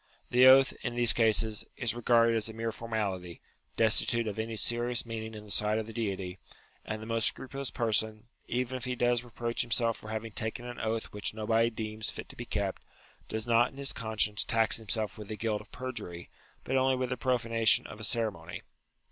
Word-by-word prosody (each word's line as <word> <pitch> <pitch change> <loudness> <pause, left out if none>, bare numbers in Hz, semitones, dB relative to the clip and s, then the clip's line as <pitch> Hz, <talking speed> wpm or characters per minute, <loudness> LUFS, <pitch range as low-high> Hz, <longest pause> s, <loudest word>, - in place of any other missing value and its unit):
The 125 +1 +7
oath, 135 0 +7
in 120 - -3
these 120 -1 +4
cases, 110 -2 +2
is 120 -4 0
regarded 115 -1 +4
as 110 0 0
a - - -7
mere 115 +1 -2
formality, 100 -7 -3 0.4
desti 110 -1 +4
tute 115 0 +2
of 105 -1 -4
any 110 0 -3
serious 120 +3 +1
meaning 110 -1 -5
in 105 - -8
the 105 - -9
sight 105 +1 +2
of 110 - -2
the 115 - -9
Deity; 95 -5 -3 0.4
and 110 0 -5
the - - -7
most 115 0 +2
scrupulous 135 0 -3
person, 110 -2 0 0.2
even 125 +1 -1
if 125 - -6
he 125 0 -2
does 120 0 +2
reproach 120 0 -3
himself 115 -1 +1
for 110 - -10
having 110 +1 -4
taken 110 +3 -3
an 120 0 -7
oath 110 0 -2
which 105 +1 -2
nobody 110 +1 +2
deems 110 -1 -3
fit - - -7
to - - -11
be - - -6
kept, - - -2 0.5
does 110 0 0
not 120 +1 +4
in 135 - -16
his 140 -1 +1
con 110 -1 -5
science 105 0 +2
tax 115 -2 +2
himself 110 -1 -2
with 105 - -8
the 110 - -5
guilt 110 -2 -1
of 105 - -18
perjury, 120 -10 -6 0.3
but 130 - -2
only 130 0 +3
with 130 -1 -2
the 125 - -1
profanation 115 -3 +2
of 110 - -9
a - - -7
ceremony. 110 -8 -1
115 Hz, 210 wpm, -30 LUFS, 110-120 Hz, 0.5 s, The